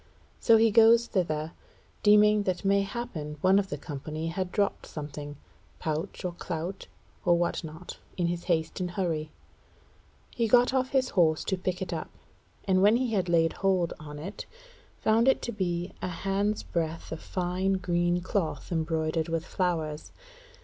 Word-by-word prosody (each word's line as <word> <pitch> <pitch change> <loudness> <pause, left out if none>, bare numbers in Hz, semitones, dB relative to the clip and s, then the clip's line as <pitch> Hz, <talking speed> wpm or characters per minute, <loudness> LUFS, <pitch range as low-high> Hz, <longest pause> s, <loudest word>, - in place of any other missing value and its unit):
So 230 -2 +6
he 225 0 +4
goes 230 +2 +6
thither, 160 -7 -1 0.5
deeming 210 0 +6
that 185 -1 -2
mayhappen 195 -6 -1
one 190 +1 +5
of 195 -1 -2
the 145 - -3
company 155 +3 -5
had 180 +2 -3
dropped 200 0 0
something, 145 -1 -7 0.4
pouch 160 +5 -3
or 180 - -1
clout, 175 +2 -5 0.4
or 175 -1 +4
what 175 0 -1
not, 160 +3 -9 0.2
in 175 - +1
his 170 0 -2
haste 165 -1 0
and 180 -1 -2
hurry. 165 -4 -2 1.1
He 230 -1 +1
got 245 +3 +5
off 260 -1 +1
his 265 -2 +1
horse 160 -4 +3
to 190 - 0
pick 185 0 -2
it - - -5
up, - - -4 0.6
and 185 -1 +3
when 205 +3 +6
he 245 -2 0
had 185 -4 0
laid 165 -1 +3
hand 185 -3 +2
on 150 -1 -9
it 185 +8 -7 0.5
found 225 +3 +3
it 265 - +5
to 235 - -2
be 175 -4 -2
a - - -2
hands 195 +4 -1
breadth 165 -1 -3
of 160 - -5
fine 185 +1 -1
green 175 -1 +1
cloth 185 -1 -2
embroidered 160 -1 -1
with 165 0 -1
flowers. 160 -6 -2
180 Hz, 165 wpm, -28 LUFS, 160-200 Hz, 1.1 s, So